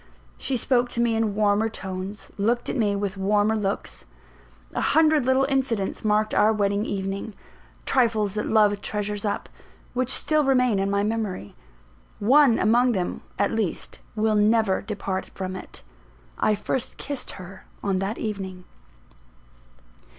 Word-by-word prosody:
She 265 Hz, -, 0 dB
spoke 245 Hz, +1 st, +1 dB
to 235 Hz, -, -5 dB
me 235 Hz, -1 st, +2 dB
in 220 Hz, -2 st, 0 dB
warmer 210 Hz, +1 st, +2 dB
tones, 190 Hz, 0 st, -6 dB
looked 235 Hz, +4 st, 0 dB
at -, -, -2 dB
me 210 Hz, -5 st, +1 dB
with 200 Hz, -1 st, -3 dB
warmer 205 Hz, +2 st, +2 dB
looks. 200 Hz, -2 st, -3 dB, 0.7 s
A -, -, -1 dB
hundred 310 Hz, -4 st, +3 dB
little 260 Hz, +1 st, +4 dB
incidents 260 Hz, -8 st, -1 dB
marked 215 Hz, 0 st, +2 dB
our 215 Hz, -, +4 dB
wedding 205 Hz, 0 st, 0 dB
evening 195 Hz, +2 st, -4 dB, 0.5 s
trifles 225 Hz, -6 st, +2 dB
that 210 Hz, -, -2 dB
love 210 Hz, -2 st, +3 dB
treasures 210 Hz, 0 st, -3 dB
up 205 Hz, -, -2 dB, 0.5 s
which 255 Hz, 0 st, 0 dB
still 310 Hz, +2 st, +3 dB
remain 250 Hz, -6 st, +3 dB
in 195 Hz, 0 st, 0 dB
my 200 Hz, 0 st, +1 dB
memory. 210 Hz, -, -3 dB, 0.6 s
One 255 Hz, +3 st, +5 dB
among 240 Hz, +3 st, +3 dB
them, 185 Hz, -4 st, -2 dB, 0.2 s
at 200 Hz, -, +1 dB
least, 220 Hz, -6 st, -2 dB, 0.2 s
will 220 Hz, 0 st, +2 dB
never 210 Hz, -1 st, +3 dB
depart 195 Hz, -2 st, -4 dB
from 185 Hz, -1 st, -4 dB
it: 185 Hz, -, -9 dB, 0.6 s
I 215 Hz, -, +3 dB
first 230 Hz, +4 st, -3 dB
kissed 285 Hz, -1 st, -5 dB
her 190 Hz, 0 st, -11 dB, 0.2 s
on 195 Hz, -2 st, 0 dB
that 195 Hz, +4 st, -2 dB
evening. 190 Hz, -4 st, -5 dB
210 Hz, 145 wpm, -25 LUFS, 200-235 Hz, 0.7 s, One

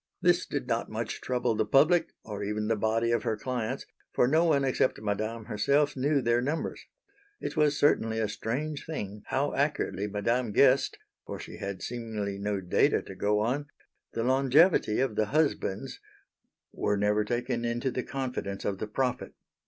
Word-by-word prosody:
This 180 Hz, 0 st, +3 dB
did 145 Hz, -3 st, -3 dB
not 115 Hz, -1 st, -1 dB
much 110 Hz, +1 st, -4 dB
trouble 125 Hz, -2 st, 0 dB
the 110 Hz, -, +2 dB
public, 150 Hz, +10 st, +4 dB, 0.2 s
or 105 Hz, -2 st, -5 dB
even 105 Hz, +1 st, -2 dB
the 115 Hz, -, +2 dB
body 110 Hz, +2 st, +1 dB
of 115 Hz, -, +2 dB
her 110 Hz, -, -1 dB
clients, 125 Hz, +2 st, -3 dB, 0.3 s
for 125 Hz, -, +3 dB
no 160 Hz, +5 st, +3 dB
one 145 Hz, -4 st, +3 dB
except 130 Hz, 0 st, +1 dB
Madame 110 Hz, +2 st, -3 dB
herself 140 Hz, +7 st, +1 dB
knew 140 Hz, +1 st, +1 dB
their 120 Hz, +1 st, +2 dB
numbers. 145 Hz, +6 st, -2 dB, 0.6 s
It -, -, -4 dB
was 150 Hz, -2 st, +3 dB
certainly 115 Hz, -6 st, +2 dB
a 110 Hz, -1 st, +1 dB
strange 140 Hz, +8 st, -3 dB
thing 105 Hz, -10 st, -5 dB
how 140 Hz, +2 st, 0 dB
accurately 140 Hz, -8 st, 0 dB
Madame 110 Hz, +3 st, -1 dB
guessed, 135 Hz, +3 st, +4 dB, 0.3 s
for -, -, -5 dB
she -, -, -9 dB
had 100 Hz, -2 st, -5 dB
seemingly 110 Hz, -5 st, -4 dB
no 100 Hz, -1 st, -1 dB
data 90 Hz, -1 st, +2 dB
to -, -, -9 dB
go 105 Hz, +1 st, +1 dB
on 135 Hz, +6 st, -1 dB, 0.5 s
the 115 Hz, -, -1 dB
longevity 135 Hz, -, +4 dB
of 130 Hz, -4 st, 0 dB
the 110 Hz, -1 st, +1 dB
husbands 145 Hz, -8 st, 0 dB, 0.7 s
were 105 Hz, -, 0 dB
never 105 Hz, +1 st, +2 dB
taken 120 Hz, +2 st, -2 dB
into 120 Hz, +2 st, -1 dB
the 125 Hz, -, -2 dB
confidence 125 Hz, -7 st, -4 dB
of 95 Hz, -2 st, -1 dB
the 110 Hz, -, -3 dB
prophet. 125 Hz, +3 st, -2 dB
120 Hz, 170 wpm, -29 LUFS, 105-135 Hz, 0.7 s, public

